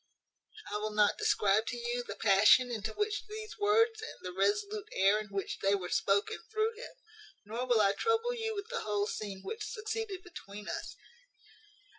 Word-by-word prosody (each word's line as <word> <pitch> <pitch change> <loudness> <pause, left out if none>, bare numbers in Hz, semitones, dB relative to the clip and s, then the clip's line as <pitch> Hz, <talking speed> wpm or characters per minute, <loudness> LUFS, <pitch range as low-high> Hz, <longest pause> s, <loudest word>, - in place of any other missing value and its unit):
"I 210 - 0
will 210 0 -3
not 210 - +3
describe 220 - +3
to 245 - -3
you 240 +1 -2
the - - -7
passion 220 +4 +5
into 220 -1 -3
which 420 0 -2
these 430 0 -8
words, 440 +2 +3
and 445 - -7
the 180 - -4
resolute 410 - 0
air 195 +2 +4
in 215 - -6
which 195 -1 -4
they 195 +1 +3
were 180 -3 -4
spoken, 200 +1 +1
threw 435 +1 +1
him: 460 +3 -10 0.5
nor 235 +4 -4
will 240 -3 +4
I 200 -1 +4
trouble 455 - +1
you 445 -2 -3
with 405 +2 -5
the 485 - -2
whole 205 -1 0
scene 200 -2 -5
which 440 0 -5
succeeded 435 -3 -4
between 210 - -10
us. - - -5
245 Hz, 180 wpm, -32 LUFS, -, 0.5 s, passion